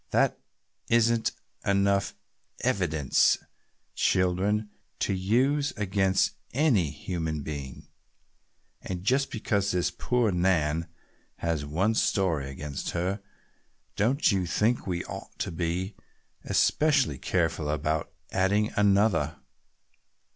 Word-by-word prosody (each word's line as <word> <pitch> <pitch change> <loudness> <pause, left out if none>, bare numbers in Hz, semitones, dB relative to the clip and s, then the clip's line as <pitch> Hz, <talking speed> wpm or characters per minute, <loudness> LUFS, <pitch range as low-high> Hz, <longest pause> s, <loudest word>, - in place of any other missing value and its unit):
"That - - +2 0.5
isn't 115 -1 +3 0.3
enough 100 -1 +2 0.5
evidence, 80 -8 +2 0.6
children, 95 +4 +1 0.3
to - - 0
use 130 +10 +1
against 95 -2 +2 0.2
any 120 - +3
human 80 0 -4
being! 70 -3 -7 0.9
And 90 -1 -5
just 130 +6 +2
because 100 -2 0
this 90 -2 +1
poor 125 -4 +1
Nan 85 -3 +1 0.5
has 80 -3 -2
one 95 +9 +1
story 85 -10 +1
against 70 +1 -5
her, 95 +4 -1 0.7
don't 125 +6 +2
you 95 -3 0
think 110 +8 +1
we 90 -2 -2
ought - - -9
to - - -3
be 90 +4 -2 0.5
especially 145 - +2
careful 80 -3 0
about 75 +1 -1 0.2
adding 100 +3 +1
another?" 105 +1 +3
95 Hz, 100 wpm, -27 LUFS, 80-105 Hz, 0.9 s, isn't